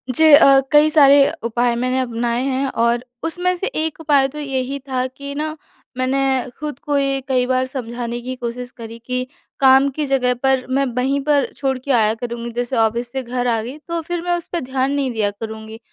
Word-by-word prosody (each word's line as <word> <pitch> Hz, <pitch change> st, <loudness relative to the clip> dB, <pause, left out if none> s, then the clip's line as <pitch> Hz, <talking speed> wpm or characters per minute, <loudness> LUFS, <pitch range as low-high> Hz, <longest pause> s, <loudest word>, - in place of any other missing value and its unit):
जी 315 Hz, +2 st, +6 dB
अ, 275 Hz, -1 st, +8 dB
कई 300 Hz, +1 st, +6 dB
सारे 285 Hz, -2 st, +6 dB, 0.3 s
उपाय 235 Hz, +1 st, 0 dB
मैंने 255 Hz, +2 st, 0 dB
अपनाए 240 Hz, -1 st, -1 dB
हैं 270 Hz, 0 st, -1 dB
और 235 Hz, +1 st, +2 dB, 0.2 s
उसमें 355 Hz, +2 st, -1 dB
से 385 Hz, -, -3 dB
एक 320 Hz, -8 st, -3 dB
उपाय 285 Hz, -3 st, +3 dB
तो 295 Hz, +3 st, -9 dB
यही 270 Hz, -1 st, -3 dB
था 260 Hz, -1 st, -2 dB
कि 280 Hz, +2 st, -8 dB
ना, 310 Hz, +1 st, -3 dB, 0.4 s
मैंने 265 Hz, 0 st, 0 dB
खुद 295 Hz, -3 st, -5 dB
को 290 Hz, -1 st, -1 dB
ये 275 Hz, -1 st, +1 dB
कई 255 Hz, -2 st, +1 dB
बार 255 Hz, 0 st, +1 dB
समझाने 240 Hz, -2 st, -5 dB
की 255 Hz, +1 st, -5 dB
कोशिश 245 Hz, 0 st, -6 dB
करी 230 Hz, 0 st, -9 dB
कि 250 Hz, 0 st, -1 dB, 0.3 s
काम 270 Hz, +1 st, +6 dB
की 295 Hz, +2 st, -3 dB
जगह 255 Hz, -2 st, +1 dB
पर 265 Hz, -1 st, +2 dB
मैं 275 Hz, +1 st, +1 dB
वहीं 265 Hz, +3 st, +1 dB
पर 290 Hz, -2 st, +2 dB
छोड़ 265 Hz, -2 st, -1 dB
के 265 Hz, +2 st, -4 dB
आया 220 Hz, -3 st, +3 dB
करूँगी, 235 Hz, +1 st, -5 dB
जैसे 245 Hz, +2 st, -3 dB
ऑफ़िस 235 Hz, +2 st, 0 dB
से 265 Hz, -1 st, -3 dB
घर 245 Hz, +1 st, -2 dB
आ 225 Hz, -2 st, +1 dB
गई, 250 Hz, +6 st, -7 dB
तो 335 Hz, 0 st, -2 dB
फिर 345 Hz, +1 st, -4 dB
मैं 350 Hz, 0 st, +1 dB
उस 340 Hz, -, -9 dB
पे 345 Hz, -, -2 dB
ध्यान 265 Hz, +1 st, -1 dB
नहीं 275 Hz, -3 st, -1 dB
दिया 210 Hz, -3 st, 0 dB
करूँगी। 220 Hz, +1 st, -8 dB
260 Hz, 205 wpm, -19 LUFS, 240-280 Hz, 0.4 s, अ